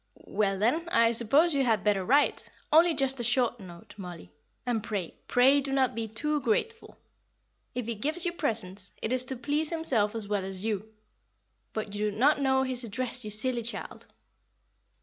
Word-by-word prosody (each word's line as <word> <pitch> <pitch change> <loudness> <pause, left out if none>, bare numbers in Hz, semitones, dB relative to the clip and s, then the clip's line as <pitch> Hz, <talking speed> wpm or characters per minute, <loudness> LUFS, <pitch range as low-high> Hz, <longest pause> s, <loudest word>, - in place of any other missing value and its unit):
"Well, 195 -1 0
then, 265 - 0
I 230 -6 +4
suppose 275 +9 +3
you 275 -1 +2
had 225 -4 +1
better 205 -2 +1
write 280 +9 +2 0.2
only 330 +1 +6
just 270 -2 +2
a - - -2
short 240 0 +1
note, 175 -3 -12
Mollie; 180 -4 -9 0.3
and 240 -3 0
pray, 200 -6 -4
pray 265 +3 +4
do 275 0 -4
not 265 -2 +2
be 225 -1 -3
too 295 +7 -1
grateful. 430 - -2 0.8
If 250 -2 -3
he 235 - -2
gives 305 - -2
you 350 - 0
presents, 205 - -2
it 225 - -1
is 255 0 +2
to 265 - -3
please 290 +5 -1
himself 255 -11 +1
as 220 -3 -5
well 205 -2 -1
as 190 +1 -5
you. 215 0 -3 0.8
But 215 -2 -5
you 210 +1 -1
do 205 - -8
not 285 +4 +3
know 265 -1 +2
his 255 -1 -1
address, 245 +2 0
you 215 - -5
silly 235 +3 +1
child." 235 +1 -7
235 Hz, 185 wpm, -28 LUFS, 210-275 Hz, 0.8 s, only